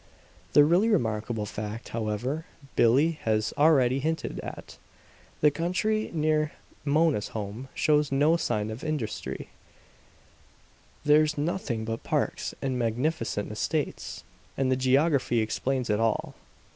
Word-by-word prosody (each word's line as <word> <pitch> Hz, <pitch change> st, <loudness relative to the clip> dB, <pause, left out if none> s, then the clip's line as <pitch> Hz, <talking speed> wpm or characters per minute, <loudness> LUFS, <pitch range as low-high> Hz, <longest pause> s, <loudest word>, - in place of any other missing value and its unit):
"The 145 Hz, -, +8 dB
really 175 Hz, +9 st, +4 dB
remarkable 110 Hz, -, 0 dB
fact, 105 Hz, +2 st, -6 dB
however, 115 Hz, +8 st, -2 dB, 0.3 s
Billie 145 Hz, +8 st, +4 dB
has 110 Hz, -1 st, 0 dB
already 135 Hz, -4 st, +4 dB
hinted 160 Hz, +3 st, -2 dB
at. -, -, -8 dB, 0.6 s
The 150 Hz, -, +6 dB
country 185 Hz, +8 st, 0 dB
near 155 Hz, -1 st, +1 dB, 0.3 s
Mona's 150 Hz, -6 st, +2 dB
home 105 Hz, +5 st, -5 dB
shows 150 Hz, -2 st, +2 dB
no 145 Hz, +4 st, +4 dB
sign 110 Hz, -10 st, -1 dB
of 110 Hz, +4 st, -7 dB
industry; 150 Hz, -9 st, -4 dB, 1.6 s
there's 150 Hz, +1 st, +4 dB
nothing 145 Hz, -8 st, -2 dB
but 115 Hz, 0 st, -3 dB
parks -, -, -1 dB
and 130 Hz, -2 st, -1 dB
magnificent 115 Hz, -2 st, -1 dB
estates. 145 Hz, +7 st, -3 dB, 0.3 s
And 130 Hz, -1 st, +1 dB
the -, -, +4 dB
geography 130 Hz, 0 st, +2 dB
explains 125 Hz, +4 st, -1 dB
it 105 Hz, 0 st, +1 dB
all. 115 Hz, -1 st, 0 dB
135 Hz, 120 wpm, -27 LUFS, 115-155 Hz, 1.6 s, The